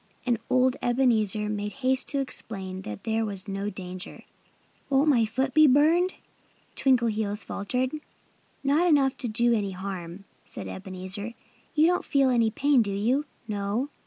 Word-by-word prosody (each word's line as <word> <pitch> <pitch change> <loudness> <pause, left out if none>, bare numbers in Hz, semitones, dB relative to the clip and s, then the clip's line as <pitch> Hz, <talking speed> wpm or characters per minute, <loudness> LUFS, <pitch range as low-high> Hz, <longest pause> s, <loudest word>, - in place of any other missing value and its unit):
And 240 -3 +1
old 255 0 +3
Ebenezer 225 -5 +2
made 210 0 -3
haste 260 0 +2
to 285 - -2
explain 190 -7 -3
that 105 - -7
there 225 0 0
was 200 -2 -4
no 195 +1 -3
danger. 185 0 -7 0.7
"Won't 280 +2 +3
my 240 -6 +4
foot 260 +4 -1
be 310 0 +7
burned?" 320 +7 +4 0.6
Twinkleheels 220 -5 +1
faltered. 250 +6 -2 0.7
"Not 295 +6 +3
enough 280 -5 +3
to 250 - -3
do 235 +2 +3
any 200 -4 -1
harm," 185 -1 -6 0.2
said - - -6
Ebenezer. 190 +4 -5 0.4
"You 305 +1 +5
don't 360 +1 +2
feel 275 -2 +2
any 230 -2 +3
pain, 275 +3 +3
do 205 -3 -1
you?" 240 +9 +1 0.2
"No!" 210 +5 -2
230 Hz, 150 wpm, -27 LUFS, 200-265 Hz, 0.7 s, be